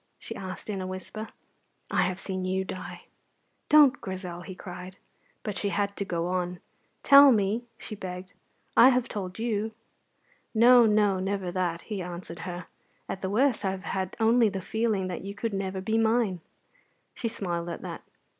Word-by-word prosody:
she -, -, -8 dB
asked, 185 Hz, -2 st, -7 dB
in 200 Hz, -3 st, -3 dB
a 185 Hz, -, -4 dB
whisper. 185 Hz, +4 st, -6 dB, 0.6 s
"I -, -, +3 dB
have 185 Hz, +1 st, 0 dB
seen 190 Hz, -1 st, -3 dB
you 190 Hz, +1 st, 0 dB
die." 185 Hz, -, -7 dB, 0.7 s
"Don't, 290 Hz, -4 st, +6 dB
Grizel!" 185 Hz, -2 st, -5 dB
he 185 Hz, +1 st, -8 dB
cried. 180 Hz, 0 st, -9 dB, 0.5 s
But 205 Hz, -3 st, -3 dB
she 205 Hz, -, 0 dB
had 200 Hz, 0 st, -1 dB
to -, -, -2 dB
go 170 Hz, -3 st, -2 dB
on. 180 Hz, -1 st, -2 dB, 0.4 s
"Tell 280 Hz, 0 st, +9 dB
me," 215 Hz, +1 st, +1 dB
she 220 Hz, -, -7 dB
begged; 185 Hz, -2 st, -7 dB, 0.4 s
"I 250 Hz, -, +9 dB
have 250 Hz, -2 st, +2 dB
told 185 Hz, -3 st, -5 dB
you." 220 Hz, -2 st, -1 dB, 0.9 s
"No, 240 Hz, +1 st, +7 dB
no, 210 Hz, -3 st, +3 dB
never 190 Hz, -1 st, -2 dB
that," 175 Hz, -2 st, -1 dB
he 210 Hz, -4 st, -5 dB
answered 175 Hz, -1 st, -7 dB
her. 175 Hz, 0 st, -6 dB, 0.4 s
"At 190 Hz, -, -5 dB
the 190 Hz, -, -2 dB
worst 235 Hz, +1 st, +2 dB
I 195 Hz, -, +1 dB
have 190 Hz, 0 st, -4 dB
had 190 Hz, -2 st, -3 dB
only 225 Hz, 0 st, +5 dB
the 195 Hz, -1 st, -4 dB
feeling 220 Hz, 0 st, 0 dB
that 180 Hz, -2 st, -4 dB
you 200 Hz, +1 st, -6 dB
could 225 Hz, +1 st, -3 dB
never 190 Hz, -1 st, -2 dB
be 220 Hz, +3 st, +1 dB
mine." 220 Hz, -5 st, +2 dB, 0.7 s
She 235 Hz, -, -3 dB
smiled 175 Hz, -6 st, -3 dB
at 170 Hz, -, -6 dB
that. -, -, -6 dB
195 Hz, 175 wpm, -28 LUFS, 185-220 Hz, 0.9 s, Tell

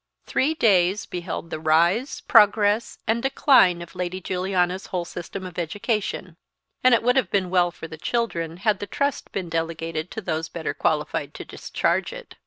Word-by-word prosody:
Three 305 Hz, +5 st, +1 dB
days 195 Hz, -, +3 dB
beheld 175 Hz, -1 st, -5 dB
the 155 Hz, -, -3 dB
rise, 170 Hz, -, +2 dB
progress, 210 Hz, +1 st, +4 dB
and 230 Hz, +1 st, +1 dB
decline 250 Hz, -, +4 dB
of 170 Hz, -, -13 dB
Lady 180 Hz, 0 st, -3 dB
Juliana's 185 Hz, 0 st, -1 dB
whole 180 Hz, -2 st, -3 dB
system 185 Hz, +3 st, -7 dB
of 180 Hz, -1 st, -6 dB
education; 185 Hz, 0 st, -3 dB, 0.5 s
and 255 Hz, -1 st, +7 dB
it 230 Hz, -, -1 dB
would 250 Hz, +1 st, +3 dB
have 265 Hz, -, +2 dB
been 185 Hz, -3 st, 0 dB
well 180 Hz, -1 st, +3 dB
for 170 Hz, -1 st, -9 dB
the 160 Hz, -1 st, -10 dB
children 170 Hz, -8 st, -2 dB
had 210 Hz, -3 st, +3 dB
the 205 Hz, -, -5 dB
trust 280 Hz, 0 st, -2 dB
been 185 Hz, -3 st, -3 dB
delegated 165 Hz, 0 st, -3 dB
to 220 Hz, -, -6 dB
those 160 Hz, -4 st, -3 dB
better 165 Hz, -2 st, -4 dB
qualified -, -, -1 dB
to -, -, -7 dB
discharge -, -, -1 dB
it. -, -, -10 dB
185 Hz, 175 wpm, -24 LUFS, 170-220 Hz, 0.5 s, and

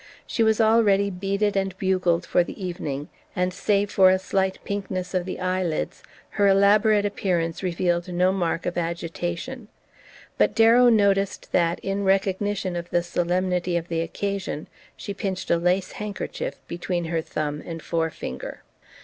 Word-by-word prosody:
She 230 Hz, -, -2 dB
was 220 Hz, 0 st, +3 dB
already 215 Hz, -3 st, +4 dB
beaded 200 Hz, +2 st, -1 dB
and 195 Hz, -1 st, -1 dB
bugled 185 Hz, -3 st, +1 dB
for 175 Hz, -, +3 dB
the -, -, -9 dB
evening, 155 Hz, -6 st, -4 dB, 0.3 s
and, 180 Hz, -1 st, 0 dB
save 205 Hz, +1 st, +1 dB
for 190 Hz, -1 st, +6 dB
a 185 Hz, -, +4 dB
slight 190 Hz, 0 st, -1 dB
pinkness 190 Hz, -2 st, -4 dB
of 180 Hz, -1 st, 0 dB
the 185 Hz, -, -5 dB
eye 185 Hz, 0 st, 0 dB
lids, 160 Hz, -, -2 dB, 0.4 s
her 200 Hz, -, +6 dB
elaborate 205 Hz, +2 st, +4 dB
appearance 175 Hz, -5 st, -1 dB
revealed 175 Hz, -1 st, 0 dB
no 180 Hz, +1 st, +3 dB
mark 175 Hz, -3 st, -1 dB
of 175 Hz, 0 st, -1 dB
agitation; 175 Hz, +7 st, -4 dB, 0.7 s
but -, -, +3 dB
Darrow 230 Hz, +2 st, +6 dB
noticed 200 Hz, -3 st, +2 dB
that, 170 Hz, -1 st, +2 dB
in 195 Hz, +1 st, -2 dB
recognition 195 Hz, 0 st, 0 dB
of 170 Hz, 0 st, -5 dB
the 175 Hz, -, +1 dB
solemnity 175 Hz, 0 st, 0 dB
of 170 Hz, 0 st, -5 dB
the 165 Hz, -1 st, 0 dB
occasion, 190 Hz, -1 st, -3 dB, 0.3 s
she 200 Hz, -, -5 dB
pinched 195 Hz, -2 st, -3 dB
a 170 Hz, -, +4 dB
lace 180 Hz, +2 st, +1 dB
handkerchief 210 Hz, -2 st, -5 dB
between 175 Hz, 0 st, -3 dB
her 165 Hz, 0 st, -1 dB
thumb 150 Hz, -1 st, -3 dB
and 165 Hz, -1 st, -7 dB
forefinger. 160 Hz, -, -4 dB
185 Hz, 155 wpm, -24 LUFS, 175-200 Hz, 0.7 s, for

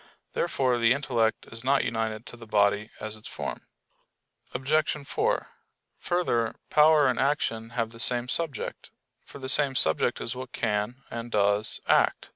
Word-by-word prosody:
Therefore 125 Hz, -2 st, +1 dB
the 115 Hz, +1 st, +5 dB
intellect 120 Hz, -5 st, 0 dB
is 115 Hz, +1 st, -9 dB
not 135 Hz, +2 st, +3 dB
united 110 Hz, -1 st, -2 dB
to -, -, -9 dB
the 115 Hz, -1 st, -12 dB
body 105 Hz, 0 st, +2 dB
as 110 Hz, 0 st, -5 dB
its 110 Hz, -, -10 dB
form. -, -, -6 dB, 0.8 s
Obj. 145 Hz, +5 st, +1 dB, 0.2 s
4: -, -, 0 dB, 0.5 s
Further, 120 Hz, -11 st, 0 dB, 0.2 s
power 150 Hz, -1 st, +6 dB
and 125 Hz, -, 0 dB
action 125 Hz, -5 st, 0 dB
have 115 Hz, -1 st, 0 dB
the 115 Hz, -, -13 dB
same 120 Hz, +1 st, 0 dB
subject; 150 Hz, -1 st, -1 dB, 0.3 s
for -, -, -12 dB
the 130 Hz, -1 st, -6 dB
same 140 Hz, 0 st, +3 dB
subject 80 Hz, -10 st, +3 dB
is 115 Hz, -, -2 dB
what 130 Hz, 0 st, -8 dB
can, 105 Hz, +5 st, -2 dB
and 115 Hz, 0 st, -5 dB
does, 105 Hz, 0 st, +1 dB
act. -, -, +2 dB
120 Hz, 155 wpm, -27 LUFS, 110-135 Hz, 0.8 s, power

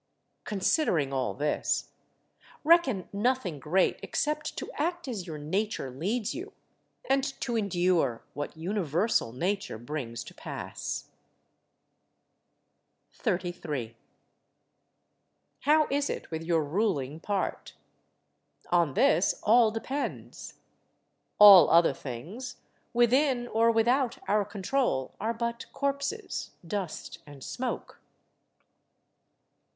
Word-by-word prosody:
Considering 190 Hz, -, +1 dB
all 130 Hz, -2 st, -1 dB
this, 150 Hz, +1 st, -1 dB, 0.7 s
reckon 295 Hz, -, +4 dB
nothing 205 Hz, -, 0 dB
great 170 Hz, +6 st, +1 dB
except 300 Hz, 0 st, -2 dB
to -, -, -5 dB
act 345 Hz, +2 st, -2 dB
as 205 Hz, -8 st, -4 dB
your 155 Hz, -2 st, -5 dB
nature 160 Hz, -1 st, -2 dB
leads 200 Hz, -, -2 dB
you, 370 Hz, +5 st, -7 dB, 0.5 s
and 270 Hz, 0 st, +3 dB, 0.2 s
to 240 Hz, -3 st, -2 dB
endure 175 Hz, -, +1 dB
what 145 Hz, +2 st, -5 dB
universal 175 Hz, -, 0 dB
Nature 185 Hz, -, -2 dB
brings 120 Hz, -1 st, -5 dB
to -, -, -12 dB
pass. -, -, -5 dB, 2.1 s
33. 160 Hz, -10 st, -3 dB, 1.6 s
How 305 Hz, +2 st, +4 dB
is 285 Hz, +1 st, +1 dB
it -, -, -5 dB
with 160 Hz, 0 st, -3 dB
your 165 Hz, -1 st, +1 dB
ruling 155 Hz, -4 st, -1 dB
part? 200 Hz, +3 st, -3 dB, 1.0 s
On 170 Hz, -6 st, +3 dB
this 175 Hz, +5 st, +3 dB
all 225 Hz, +1 st, +6 dB
depends. 260 Hz, +6 st, -5 dB, 0.8 s
All 200 Hz, -6 st, +10 dB
other 165 Hz, -3 st, +5 dB
things, 180 Hz, -, -7 dB, 0.4 s
within 245 Hz, +1 st, +3 dB
or 225 Hz, +1 st, +3 dB
without 240 Hz, +2 st, +2 dB
our 210 Hz, 0 st, +2 dB
control, 205 Hz, -, -1 dB
are 220 Hz, +3 st, 0 dB
but 235 Hz, 0 st, -3 dB
corpses, 280 Hz, +10 st, -2 dB, 0.2 s
dust, 185 Hz, -1 st, -5 dB
and 140 Hz, -2 st, -11 dB
smoke. 250 Hz, 0 st, -5 dB
200 Hz, 100 wpm, -29 LUFS, 160-245 Hz, 2.1 s, All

